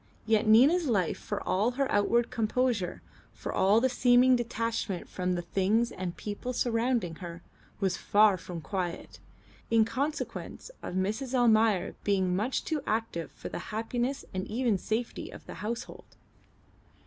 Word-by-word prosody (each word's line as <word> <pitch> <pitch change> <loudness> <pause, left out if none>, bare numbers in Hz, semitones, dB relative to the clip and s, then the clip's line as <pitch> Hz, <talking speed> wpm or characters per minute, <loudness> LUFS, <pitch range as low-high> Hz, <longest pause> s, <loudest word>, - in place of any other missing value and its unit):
Yet 220 0 +2
Nina's 285 +10 +6
life 195 -9 +1
for - - -5
all 215 +6 +2
her 275 - +2
outward 230 +3 +2
composure, 225 -3 0 0.3
for - - -6
all 200 +4 +4
the 260 - +3
seeming 250 0 +5
detachment 230 -5 -2
from 180 -1 -2
the 175 - -3
things 205 +7 +1
and 180 -1 -5
people 210 +4 -4
surrounding 230 -7 0
her, 170 -2 -8 0.4
was 190 -2 0
far 210 -1 +4
from 175 -2 -7
quiet, 180 -1 -4 0.5
in 225 -1 +4
consequence 260 - -4
of - - -6
Mrs. 215 +8 -1
Almayer 225 -5 +3
being 190 -3 +1
much 220 +7 -1
too 310 -3 -1
active 215 -6 -2
for - - -8
the - - -5
happiness 240 +5 -2
and 185 0 -3
even 230 -3 0
safety 220 +5 -3
of - - -11
the - - -8
household. 230 +3 -6
220 Hz, 150 wpm, -29 LUFS, 190-245 Hz, 0.5 s, Nina's